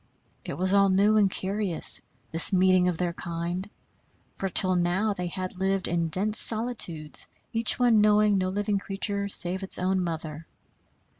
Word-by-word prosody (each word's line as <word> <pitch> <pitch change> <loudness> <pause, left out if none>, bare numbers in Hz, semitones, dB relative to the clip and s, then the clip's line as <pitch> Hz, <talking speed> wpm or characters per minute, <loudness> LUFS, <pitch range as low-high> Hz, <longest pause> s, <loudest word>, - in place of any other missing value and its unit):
It - - -6
was 185 +2 0
all 200 0 +4
new 200 +3 +2
and 205 -2 +3
curious, 190 -2 0 0.3
this 165 +4 +6
meeting 185 -1 +3
of 180 -2 -2
their 175 0 -3
kind; 175 +3 -6 0.6
for 195 - -5
till 185 0 +1
now 180 +5 0
they 180 -2 -5
had 185 +1 -7
lived 195 0 0
in 170 -1 -1
dense 205 +7 +2
solitudes, 215 -10 0 0.3
each 225 -1 +4
one 240 -4 +3
knowing 210 -1 +3
no 185 0 -2
living 205 +1 -2
creature 200 +1 -4
save 185 0 +1
its 190 - 0
own 185 +1 -1
mother. 160 -2 -6
190 Hz, 160 wpm, -25 LUFS, 175-205 Hz, 0.6 s, this